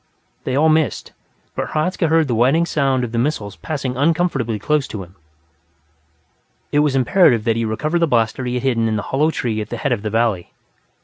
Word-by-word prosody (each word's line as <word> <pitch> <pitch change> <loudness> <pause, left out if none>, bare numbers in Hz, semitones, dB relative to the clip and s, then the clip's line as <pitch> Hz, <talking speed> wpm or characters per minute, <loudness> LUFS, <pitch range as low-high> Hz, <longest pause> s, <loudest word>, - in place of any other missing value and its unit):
They 130 - -1
all 150 +3 +3
missed, 155 -1 0 0.4
but - - -4
Hradzka 165 +3 0
heard 160 -1 +3
the 125 - -1
whining 135 +9 +3
sound 135 -5 0
of 120 - -4
the 115 - -1
missiles 115 -7 -2
passing 135 -5 -4
uncomfortably 145 -6 0
close 150 +6 0
to 100 -3 -6
him. 90 +1 -16 1.6
It 145 - +2
was 150 -2 +2
imperative 135 - +3
that 115 -1 +1
he 115 0 -1
recover 155 +10 -1
the 170 - +2
blaster 115 -1 0
he 125 0 -2
had 125 - -2
hidden 115 -4 +1
in 110 - -1
the 105 - -2
hollow 150 +4 +3
tree 115 -8 -2
at 105 - -7
the - - -4
head 140 - -2
of 120 - 0
the 110 - -3
valley. 110 -5 -1
130 Hz, 205 wpm, -19 LUFS, 115-155 Hz, 1.6 s, all